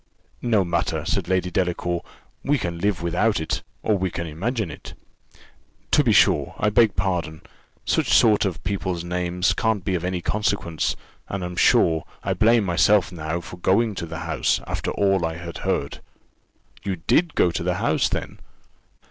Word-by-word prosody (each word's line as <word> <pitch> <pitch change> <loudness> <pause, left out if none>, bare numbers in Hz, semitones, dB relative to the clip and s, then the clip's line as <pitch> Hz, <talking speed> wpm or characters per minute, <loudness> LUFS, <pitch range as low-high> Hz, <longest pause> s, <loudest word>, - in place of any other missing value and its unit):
"No 110 -5 +2
matter," 85 -1 -1
said - - -1
Lady 90 -1 0
Delacour; 90 -1 -1 0.4
"we 145 +1 +2
can 85 -7 -4
live 95 -2 0
without 90 +4 +1
it; 80 - -2 0.2
or 110 - +2
we 95 0 0
can 85 0 -4
imagine 95 - -3
it." 75 - -10 1.0
"To - - +5
be - - +3
sure - - +3
I 105 - +1
beg 110 -1 +4
pardon; 85 -4 -2 0.4
such - - +1
sort 110 -3 +5
of 95 -5 -3
people's 90 -2 -2
names 90 +1 0
can't 110 -5 0
be 95 - 0
of 90 -2 -1
any 90 0 -1
consequence, 100 -4 -1 0.3
and, 95 -1 -3
I'm 90 0 -6
sure, 80 -2 +3 0.2
I - - 0
blame 115 0 +4
myself 95 +2 +3
now 80 0 -4
for 90 - -10
going 105 +5 +2
to 85 -3 -5
the 80 +1 -6
house, 85 - +1
after - - -3
all 95 -3 +1
I 80 0 -1
had 85 0 -7
heard." - - -2 0.8
"You 95 -2 -2
did 150 - +1
go 90 - +3
to - - -3
the - - 0
house, - - +1
then?" - - -4
90 Hz, 175 wpm, -23 LUFS, 85-105 Hz, 1.0 s, To